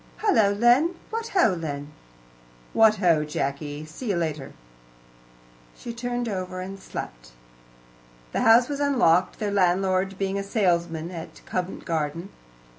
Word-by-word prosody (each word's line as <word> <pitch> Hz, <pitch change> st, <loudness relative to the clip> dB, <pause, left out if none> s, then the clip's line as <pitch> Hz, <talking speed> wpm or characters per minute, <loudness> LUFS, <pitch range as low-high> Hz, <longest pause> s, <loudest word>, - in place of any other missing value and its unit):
"Hullo, 220 Hz, -, +3 dB
Len! 260 Hz, +9 st, +4 dB, 0.2 s
What 455 Hz, +1 st, -3 dB
ho, 355 Hz, -, +3 dB
Len!" 145 Hz, -4 st, -5 dB, 0.8 s
"What 220 Hz, -1 st, +6 dB
ho, 170 Hz, -6 st, +3 dB
Jacky! 145 Hz, 0 st, -4 dB
see 155 Hz, +11 st, -8 dB
you -, -, +2 dB
again -, -, 0 dB
later." 150 Hz, -4 st, -4 dB, 1.2 s
She 235 Hz, -, -7 dB
turned 245 Hz, 0 st, -3 dB
over 185 Hz, -3 st, -4 dB
and 195 Hz, +1 st, -6 dB
slept. -, -, -8 dB, 1.0 s
The -, -, -1 dB
house 235 Hz, +2 st, +6 dB
was 285 Hz, -1 st, -4 dB
unlocked, 240 Hz, -, +3 dB
their 210 Hz, -2 st, -2 dB
landlord 190 Hz, 0 st, +1 dB
being 195 Hz, 0 st, -1 dB
a -, -, -3 dB
salesman 170 Hz, -5 st, 0 dB
at 165 Hz, -2 st, -9 dB
Convent 185 Hz, 0 st, -4 dB
Garden. 165 Hz, +2 st, -2 dB
185 Hz, 135 wpm, -25 LUFS, 165-225 Hz, 1.2 s, What